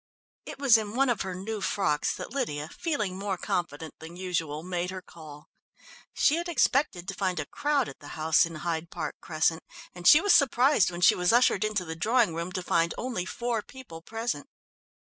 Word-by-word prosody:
It - - -7
was 265 -5 +5
in 215 0 -6
one 270 0 +3
of 235 -5 0
her 190 -1 -4
new 210 +3 -5
frocks 185 -8 0
that - - -7
Lydia, 155 - -3
feeling 215 - -2
more 195 -2 -2
confident 165 -3 -3
than 165 +2 -10
usual, 165 -4 -3
made 180 0 -3
her 185 0 -5
call. 150 -3 -13 0.6
She 305 - +2
had 345 +1 -3
expected 260 - +1
to 195 - -3
find 185 -1 -1
a - - -3
crowd 290 -4 0
at - - -10
the - - -12
house 160 +1 +4
in 165 -1 -4
Hyde 165 0 -3
Park 155 - -5
Crescent, 160 +1 0 0.3
and 175 0 -3
she 300 - +9
was 405 +2 +4
surprised 265 - +4
when 175 0 -7
she 180 - +7
was 180 0 +1
ushered 240 -1 +4
into 210 -4 -1
the 160 0 -5
drawing 220 +2 +2
room 170 +2 -4
to 185 - -3
find 170 -1 +1
only 230 -8 -3
four 235 0 -2
people 225 -11 -12
present. 225 -6 -4
185 Hz, 195 wpm, -28 LUFS, 165-240 Hz, 0.6 s, she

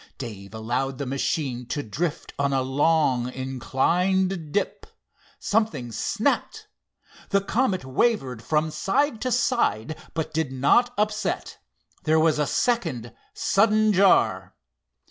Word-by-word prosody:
Dave 105 -5 -8
allowed 125 +4 -2
the 140 - -3
machine 130 -2 -2
to 145 +3 -3
drift 150 +9 -4
on 140 0 +1
a 135 -1 +1
long, 135 -2 +2
inclined 165 +7 0
dip. 205 - -2 0.5
Something 180 - -1
snapped. - - -1 0.6
The 200 - +3
Comet 200 - 0
wavered 130 - 0
from 155 +5 0
side 255 - 0
to 255 - -1
side 235 - +1 0.2
but 160 -1 -3
did 160 -4 -1
not 145 - +3
upset. 210 +1 -2 0.5
There 160 0 +4
was 155 -1 +3
a 150 - +1
second 130 - -1 0.2
sudden 215 +1 +3
jar. 195 0 +3
155 Hz, 120 wpm, -25 LUFS, 130-200 Hz, 0.6 s, There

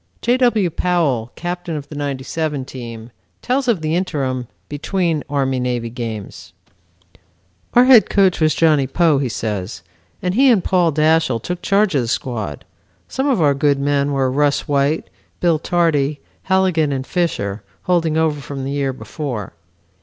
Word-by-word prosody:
J. 245 +2 +3
W. 225 -8 +2
Powell, 150 -10 0
captain 175 -1 -4
of 145 -2 -6
the 150 - -8
'97 145 +1 -3
team, 120 -3 -9 0.3
tells 260 +1 0
of 220 -9 +2
the 155 0 0
interim 135 -9 -2 0.2
between 160 +1 -1
Army 135 -2 0
Navy 120 -2 -2
games. 115 -4 -7 1.2
"Our 245 +1 +7
head 255 -4 +7
coach 190 -4 +3
was 155 -1 +3
Johnny 150 -5 +3
Poe," 160 0 +2
he 135 -3 -1
says, 100 -4 -4 0.4
"and 180 0 -1
he 265 +5 +5
and 215 -7 +4
Paul 180 -3 +2
Dashiell 155 -4 +2
took 180 +9 -5
charge 200 -1 +2
of 140 - +2
the 120 - -3
squad. 110 - -3 0.4
Some 265 +2 -2
of 225 - +2
our 145 -1 +4
good 140 0 +2
men 140 0 +1
were 135 -2 +1
Rus 145 +3 +1
White, 145 +2 +1 0.3
Bill 170 -3 +2
Tardy, 155 -4 +1 0.3
Halligan 185 -6 +2
and 130 -1 -2
Fisher, 110 - -2 0.2
holding 165 -3 +1
over 155 -2 +1
from 135 +1 -6
the 135 - -3
year 140 -2 -1
before. 125 - -6
150 Hz, 160 wpm, -19 LUFS, 130-175 Hz, 1.2 s, Our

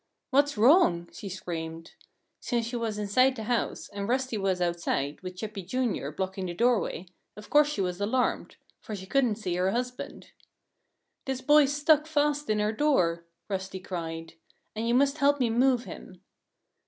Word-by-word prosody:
"What's 285 -1 +3
wrong?" 210 - +4
she 200 - -7
screamed. 165 -3 -6 0.5
Since 235 -2 -1
she 240 +2 -5
was 225 -3 -2
inside 255 +6 +3
the 220 - -6
house, 235 +1 -1
and 200 +1 -5
Rusty 260 -1 0
was 195 -3 0
outside, 170 -5 -1
with 185 0 -7
Chippy, 210 +1 -6
Jr., 210 - -2
blocking 190 +4 -4
the 175 - -5
doorway, 235 -5 +1 0.3
of 210 - -12
course 295 0 +6
she 295 -9 -2
was 180 0 -2
alarmed 250 +5 0 0.2
for 215 - -7
she 190 -1 -8
couldn't 250 0 +2
see 200 -5 -3
her 185 +1 +2
husband. 250 +3 -4 0.9
"This 265 -1 -3
boy's 295 -1 +5
stuck 300 +1 +3
fast 295 -2 0
in 215 0 +2
our 210 +1 +1
door," 180 - +1 0.2
Rusty 190 -1 -4
cried. 165 -3 -6 0.4
"And 225 +2 -2
you 235 - +2
must 280 +3 +2
help 285 0 +3
me 240 -3 +2
move 250 +1 +3
him." 185 -5 -11
215 Hz, 165 wpm, -28 LUFS, 185-260 Hz, 0.9 s, course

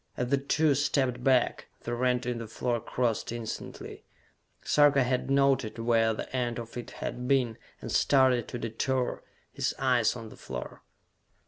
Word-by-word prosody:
As 125 0 -1
the 140 - +3
two 150 +2 +2
stepped 130 -3 0
back, 130 -2 +2
the 120 - -4
rent 125 0 +1
in 120 -1 -2
the 115 - -6
floor 120 +2 -1
closed 115 -1 -1
instantly. 115 -2 -6 0.6
Sarka 145 -2 +4
had 125 +1 -1
noted 135 -5 +2
where 115 -1 +2
the 110 - -5
end 120 -2 -1
of 115 -1 -7
it 120 - -6 0.2
had 125 0 -4
been, 125 -5 +1 0.2
and - - -6
started 130 -4 +3
to - - -5
detour, 120 +3 -2 0.3
his - - -1
eyes 125 -4 +2
on 115 -2 -8
the - - -12
floor. 60 -1 -7
125 Hz, 160 wpm, -29 LUFS, 115-130 Hz, 0.6 s, Sarka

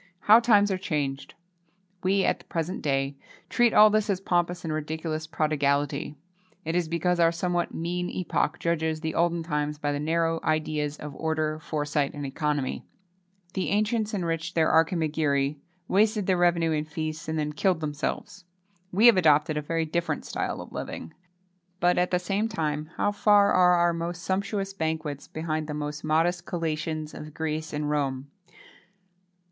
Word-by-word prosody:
How 215 +2 +7
times 210 -4 +4
are 185 - -1
changed! 145 -7 -3 0.7
We, 190 +1 +2
at - - +1
the - - -18
present 170 +3 -3
day, 135 -1 -1 0.3
treat 240 -1 +4
all 210 0 +7
this 215 0 +1
as 195 -2 +1
pompous 175 -1 0
and 160 -2 -2
ridiculous 155 +1 -3
prodigality. 145 -2 0 0.5
It 165 +2 -2
is 175 -2 +1
because 175 +2 0
our 165 -1 +5
somewhat 175 0 -1
mean 175 +2 -2
epoch 175 -2 -1
judges 160 -2 -1
the 160 -1 -2
olden 170 0 +1
times 150 -2 -2
by 145 0 -1
the 145 - -2
narrow 165 +2 0
ideas 155 -1 -1
of 150 -2 -8
order, 155 -1 -1
foresight, 150 -2 -2
and 145 -1 -5
economy. 145 -1 -2 0.7
The 190 - -1
ancients 215 +1 +1
enriched 170 -4 -2
their 160 -1 +3
Archimagiri, 155 -3 +1 0.3
wasted 210 +1 +2
their 185 - +2
revenue 170 -2 +2
in 155 -1 0
feasts, 155 +1 -5
and 160 - -1
then 150 -1 -2
killed 180 +2 +1
themselves. 155 +4 -4 0.5
We 205 +6 +3
have 235 -5 +8
adopted 155 -2 +4
a 150 - -1
very 165 +2 -1
different 170 +2 -2
style - - -3
of - - -11
living. 80 - -6 0.7
But, 180 0 +3
at 180 - +2
the 180 - +2
same 195 +4 -1
time, 155 -8 -2
how 205 - +2
far 205 0 +4
are 180 -1 +5
our 175 0 +3
most 170 +1 -4
sumptuous 195 +2 -2
banquets 160 -5 -3
behind 155 -1 -3
the 150 - -4
most 150 0 -4
modest 165 +3 +1
collations 155 -2 -3
of 150 0 -9
Greece 155 -1 -3
and 150 0 -2
Rome! 140 -2 -2
160 Hz, 165 wpm, -27 LUFS, 150-180 Hz, 0.7 s, have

